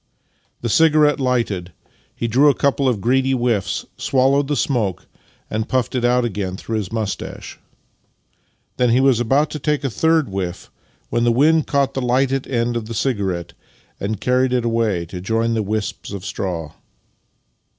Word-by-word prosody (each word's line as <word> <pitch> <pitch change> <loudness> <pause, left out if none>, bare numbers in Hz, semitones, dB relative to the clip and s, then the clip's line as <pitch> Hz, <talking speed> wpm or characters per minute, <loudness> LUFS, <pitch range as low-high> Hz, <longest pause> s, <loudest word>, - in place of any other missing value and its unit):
The 120 - -2
cigarette 150 +3 +4
lighted, 115 -9 -1 0.4
he 115 - -2
drew 135 +6 +5
a 140 - +2
couple 140 -1 +1
of 110 -6 -1
greedy 130 +4 +2
whiffs, 120 -7 0
swallowed 135 +1 +2
the 145 - 0
smoke, 115 - -1 0.4
and 110 +1 -3
puffed 130 -2 0
it 125 -2 -1
out 125 0 +3
again 95 -4 -3
through 110 +2 -3
his 100 -4 -4
moustache. 110 -3 -5 1.2
Then 125 -1 +3
he 120 +2 +4
was 135 -3 +4
about 135 +6 +2
to 150 - -5
take 150 0 0
a 135 - -1
third 160 +3 +2
whiff, 95 -2 -5 0.4
when 120 - +1
the 120 - +4
wind 155 +6 +3
caught 140 -1 +1
the 135 - -2
lighted 130 +2 +1
end 120 -1 -1
of 115 -2 -2
the 115 - -6
cigarette 100 -8 -2 0.5
and 100 +1 -3
carried 125 +2 +1
it 125 -2 +1
away 115 -7 0
to 90 +2 -8
join 115 +4 0
the 110 - 0
wisps 105 0 -3
of 100 -2 -6
straw 85 -7 -4
120 Hz, 170 wpm, -20 LUFS, 105-135 Hz, 1.2 s, drew